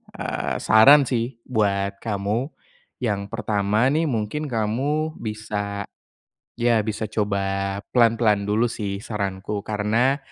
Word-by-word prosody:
eee, - - -3
saran 140 +7 +7
sih 120 0 -2
buat 100 -4 0
kamu. 105 +4 -2 0.6
Yang 105 -4 0
pertama 105 +2 +1
nih, 160 +2 +1
mungkin 125 +4 -2
kamu 135 +8 -1
bisa 105 -2 -4 0.8
ya 120 -2 +3
bisa 110 0 -2
coba 100 -2 -1 0.2
pelan-pelan 115 -4 +4
dulu 110 +4 +2
sih 100 -3 -4
saranku. 100 -1 -3
Karena 110 +6 +1
110 Hz, 110 wpm, -23 LUFS, 100-120 Hz, 0.8 s, saran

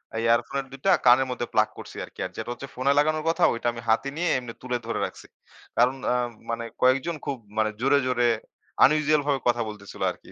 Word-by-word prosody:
আ - - -2
ইয়ারফোনের 115 +4 +1
দুইটা 135 +8 0
কানের 125 +2 +6
মধ্যে 120 -1 -3
প্লাগ - - +3
করছি - - -10
আরকি। - - -19
আর 95 - -6
যেটা 110 - -5
হচ্ছে 130 +3 -9
ফোনে 130 +2 +2
লাগানোর 155 +1 +2
কথা, 165 - +1
ওইটা 115 +1 -3
আমি 115 - -7
হাতে 115 +5 +2
নিয়ে 175 +1 +1
এমনি 125 -2 -6
তুলে 125 -1 -2
ধরে - - -2
রাখছি। - - -10 0.5
কারণ 125 +3 +4 0.2
আ - - +2 0.3
মানে 115 0 -2 0.2
কয়েকজন 135 +6 +3
খুব 140 - -2 0.2
মানে 110 0 +2
জোরে, 135 +2 +4
জোরে 120 -1 +2 0.6
unusual 150 +1 +3
ভাবে 140 -2 +2
কথা 120 0 +2
বলতেছিলো 105 -2 -8
আরকি। - - -15
130 Hz, 205 wpm, -25 LUFS, 120-140 Hz, 0.6 s, কানের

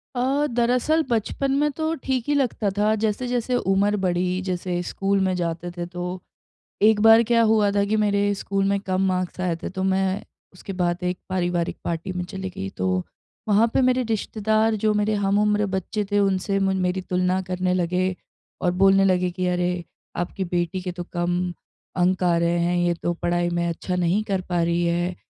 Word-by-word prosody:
अ, 270 +4 +1
दरअसल 250 +7 +2
बचपन 240 +4 0
में 295 0 +2
तो 320 0 -1
ठीक 260 -3 0
ही 290 - +2
लगता 240 -7 0
था 215 +1 +3
जैसे-जैसे 245 +3 -1 0.2
उम्र 205 +2 +2
बढ़ी 180 +1 0
जैसे 180 -1 -2
स्कूल 195 +2 -1
में 190 -1 +1
जाते 170 0 -3
थे 175 0 -5
तो 180 +1 -5 0.6
एक 215 0 +5
बार 225 +1 +7
क्या 230 0 +3
हुआ 210 -2 +3
था 200 0 +2
कि 215 +2 0
मेरे 205 -1 +2
स्कूल 195 0 -1
में 200 0 +1
कम 190 -1 -1
मार्क्स 185 0 -2
आए 175 -2 0
थे - - -3
तो 190 0 -4
मैं 190 0 0 0.3
उसके 190 +1 -8
बाद 175 0 0
एक 180 0 -1
पारिवारिक 175 -2 -1
पार्टी 170 +3 -3
में 180 0 -3
चली 190 +1 -6
गई। 95 - -6
तो 95 0 0 0.6
वहाँ 215 +3 +4
पे - - +3
मेरे 255 0 +3
रिश्तेदार 220 0 +1
जो 215 -1 +3
मेरे 210 +1 +1
हम 200 +1 +2
उम्र 210 0 +2
बच्चे 210 +3 -2
थे 205 - +3
उनसे 195 0 +1
म 195 0 +1
मेरी 180 +1 0
तुलना 180 +1 0
करने 180 0 0
लगे 180 +1 0 0.5
और 180 - +2
बोलने 195 +1 +4
लगे 180 -1 +2
कि, 180 0 -2
"अरे 180 0 0 0.3
आपकी 175 +2 -2
बेटी 175 +1 -2
के 180 -1 -4
तो 175 0 -6
कम 175 +1 -1 0.4
अंक 185 0 +1
आ 175 -1 +3
रहे 170 0 +1
हैं 175 +1 +1
ये 175 0 +2
तो 175 - +1
पढ़ाई 175 0 0
में 170 0 0
अच्छा 180 +2 -3
नहीं 180 +4 +1
कर 195 -3 -1
पा 175 -1 +1
रही 170 +1 +1
है, 175 +1 0
185 Hz, 195 wpm, -23 LUFS, 175-210 Hz, 0.6 s, बार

